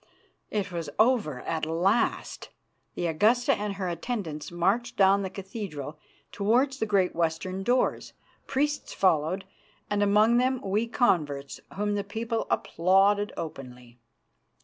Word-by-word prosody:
It 200 -3 -2
was 165 -3 -4
over 215 - +2
at 160 -1 -3
last. 190 +8 0 0.5
The 175 - -2
Augusta 215 +9 +3
and 205 -1 -3
her 190 -1 -3
attendants 170 -4 -4
marched 200 +8 0
down 195 0 +5
the 190 - -3
cathedral 185 - -7 0.3
towards 255 +7 +1
the 220 - 0
great 195 -3 +2
western 170 +3 -2
doors, 245 +6 0 0.3
priests 290 +2 -1
followed, 185 +1 +1 0.5
and, 205 0 +1
among 210 +3 +4
them, 255 +1 +2
we 205 +4 0
converts, 150 - 0 0.2
whom 205 +1 -1
the 205 -1 -1
people 225 +2 -3
applauded 195 +4 +2
openly. 125 -5 -8
195 Hz, 125 wpm, -27 LUFS, 165-225 Hz, 0.5 s, down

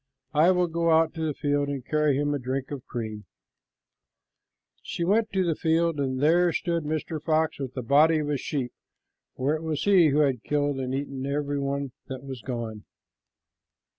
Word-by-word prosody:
I 155 +4 +5
will 180 -1 +3
go 170 0 0
out 160 -1 +4
to 160 -1 -2
the 150 - -2
field 145 -1 0
and 135 -3 -4
carry 150 -3 +2
him 145 0 0
a 145 - -1
drink 130 +2 -3
of 140 -4 -5
cream." 110 -3 -5 1.6
She 170 - -4
went 215 +5 +2
to 190 -1 +2
the 170 - +2
field, 165 0 +1
and 130 -2 -1
there 170 +4 +4
stood 170 -2 -1
the 155 0 -3
fox 160 -1 +1
with 130 -2 -5
the 125 - -3
body 150 +6 +5
of 150 -1 -2
a 145 - +1
sheep, 130 -3 -3 0.6
for 135 +4 +1
it 155 - -5
was 160 -2 -2
he 190 -5 +6
who 150 +1 +3
had 135 -5 +1
killed 145 0 0
and 130 0 -2
eaten 135 -1 -4
every 145 0 -1
one 140 -1 -2 0.2
that 130 -1 -7
was 130 -3 -7
gone. 115 -4 -5
145 Hz, 190 wpm, -26 LUFS, 135-160 Hz, 1.6 s, he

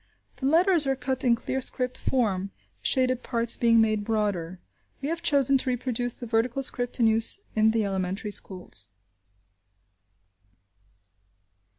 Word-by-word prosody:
The 265 - -2
letters 335 0 +3
are 270 - +1
cut 260 0 -3
in 240 -2 +4
clear 265 +3 -4
script 250 0 -2
form, 200 -7 -1 0.3
the - - -1
shaded 255 -2 +2
parts 235 -1 +1
being 230 -1 +3
made 215 -1 +1
broader. 200 -5 -2 0.4
We 280 - -4
have 335 +1 -3
chosen 275 -5 +3
to 255 - -3
reproduce 245 -1 -2
the 245 - -8
vertical 235 +4 0
script 245 -1 +1
in 235 - +4
use 225 - +4
in 220 0 +4
the 220 -1 0
elementary 195 +2 -3
schools. 180 - -3
235 Hz, 145 wpm, -26 LUFS, 215-260 Hz, 0.4 s, in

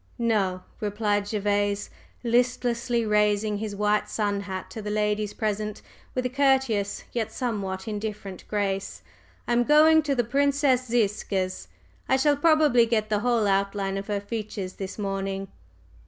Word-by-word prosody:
"No," 200 -6 0 0.2
replied 205 -1 0
Gervase, 205 -1 0 0.3
listlessly 240 -1 +1
raising 210 0 +2
his 210 -1 -4
white 210 +1 +1
sun 205 -2 -1
hat 190 -2 -6
to 220 - -6
the 210 - -5
ladies 210 0 0
present 215 -1 -2 0.3
with 255 -1 -1
a - - +1
courteous, 260 -6 +1
yet 230 -3 -2
somewhat 195 -6 -3
indifferent 205 -3 -5
grace. 195 -2 -2 0.4
"I'm 240 0 +3
going 310 +3 +6
to 290 -2 -1
the 240 - +2
Princess 275 0 +2
Ziska's. 200 -5 -1 0.4
I 265 - +4
shall 290 +2 +3
probably 295 -6 +4
get 220 -2 0
the 210 -1 +1
whole 235 -1 +2
outline 195 0 0
of 195 0 -4
her 205 -1 -1
features 205 -3 -5
this 195 0 -6
morning." 195 -1 -3
210 Hz, 140 wpm, -26 LUFS, 200-240 Hz, 0.4 s, going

